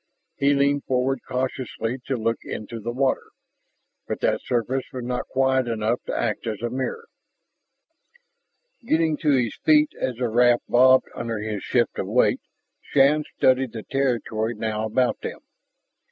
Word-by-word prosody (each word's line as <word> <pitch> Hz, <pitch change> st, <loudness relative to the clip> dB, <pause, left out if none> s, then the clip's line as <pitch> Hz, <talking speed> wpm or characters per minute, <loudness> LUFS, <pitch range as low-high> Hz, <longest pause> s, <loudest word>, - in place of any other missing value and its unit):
He 140 Hz, +1 st, +3 dB
leaned 140 Hz, 0 st, +2 dB
forward 130 Hz, +1 st, 0 dB
cautiously 125 Hz, -1 st, -3 dB
to 135 Hz, -, -1 dB
look 115 Hz, 0 st, -1 dB
into 115 Hz, +2 st, -6 dB
the 115 Hz, +2 st, -5 dB
water, 130 Hz, +2 st, +1 dB, 0.9 s
but -, -, -3 dB
that -, -, +1 dB
surface 125 Hz, +2 st, -1 dB
was 125 Hz, -1 st, -5 dB
not 125 Hz, 0 st, -3 dB
quiet 130 Hz, -1 st, +1 dB
enough 115 Hz, +1 st, -1 dB
to -, -, -2 dB
act 110 Hz, 0 st, -2 dB
as 110 Hz, -2 st, -3 dB
a 120 Hz, -, -1 dB
mirror. 135 Hz, -, -3 dB, 1.8 s
Getting 160 Hz, -6 st, +2 dB
to 150 Hz, -, 0 dB
his 125 Hz, -6 st, +2 dB
feet 305 Hz, -1 st, +5 dB
as 130 Hz, -, -1 dB
the 125 Hz, +1 st, -1 dB
raft 120 Hz, +1 st, +3 dB
bobbed 130 Hz, +1 st, +5 dB
under 115 Hz, -1 st, -4 dB
his 105 Hz, -1 st, -4 dB
shift -, -, 0 dB
of -, -, -2 dB
weight, -, -, +2 dB, 0.4 s
Shann 145 Hz, +2 st, +3 dB
studied 130 Hz, -2 st, +3 dB
the 110 Hz, -2 st, -6 dB
territory 120 Hz, -4 st, -1 dB
now 110 Hz, 0 st, -2 dB
about 125 Hz, +3 st, +1 dB
them. -, -, -6 dB
125 Hz, 155 wpm, -24 LUFS, 115-135 Hz, 1.8 s, feet